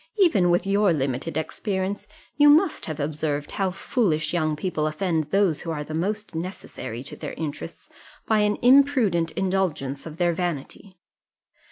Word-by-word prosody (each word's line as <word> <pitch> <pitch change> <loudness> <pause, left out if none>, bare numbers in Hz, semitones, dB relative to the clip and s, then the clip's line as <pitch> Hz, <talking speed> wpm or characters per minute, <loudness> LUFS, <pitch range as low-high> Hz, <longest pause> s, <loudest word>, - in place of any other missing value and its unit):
Even 235 - +4
with 175 +1 +2
your 200 0 +3
limited 140 +2 -2
experience, 195 +4 -3 0.3
you 295 0 +6
must 315 +4 +3
have 155 -2 -5
observed 150 0 -2
how 195 -1 0
foolish 180 - 0
young 155 -3 +1
people 155 -1 -1
offend 160 0 -1
those 190 -1 +1
who 165 - -6
are 150 -2 -3
the 155 - -8
most 205 +5 -2
necessary 160 - -6
to 140 - -6
their - - -6
interests, 155 -2 -6 0.4
by 220 -1 +2
an 210 0 +2
imprudent 250 - +4
indulgence 170 -8 -1
of 155 0 -9
their 175 -1 +2
vanity. 175 +3 -5
175 Hz, 155 wpm, -24 LUFS, 155-200 Hz, 0.4 s, you